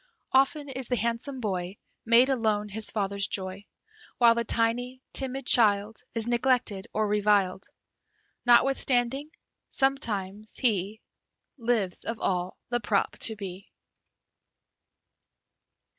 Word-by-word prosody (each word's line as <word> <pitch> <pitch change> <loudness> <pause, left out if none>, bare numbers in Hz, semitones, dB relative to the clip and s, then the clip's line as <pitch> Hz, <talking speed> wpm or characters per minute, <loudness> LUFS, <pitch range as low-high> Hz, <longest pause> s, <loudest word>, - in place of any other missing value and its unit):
Often 275 +2 +2
is 260 -2 -3
the 250 - 0
handsome 235 +4 -3
boy 190 -3 -3 0.3
Made, 235 +3 +6
alone, 215 -5 0
his 215 +2 -4
father's 200 -1 -1
joy; 190 +1 -5 0.5
While 235 -1 +6
the 235 0 -1
tiny, 240 +3 -1
timid 265 0 0
child 210 -2 +3
Is 225 -1 0
neglected 240 -4 0
or 215 0 0
reviled. 205 -2 +1 0.8
Notwithstanding, 260 +2 +2 0.4
sometimes 215 -7 -2
he 215 -3 0 0.6
Lives, 225 -6 -1
of 230 0 -4
all, 180 -1 -1
the 240 0 0
prop 205 -2 0
to 220 - +4
be. 195 -1 -8
225 Hz, 110 wpm, -27 LUFS, 200-245 Hz, 0.8 s, Made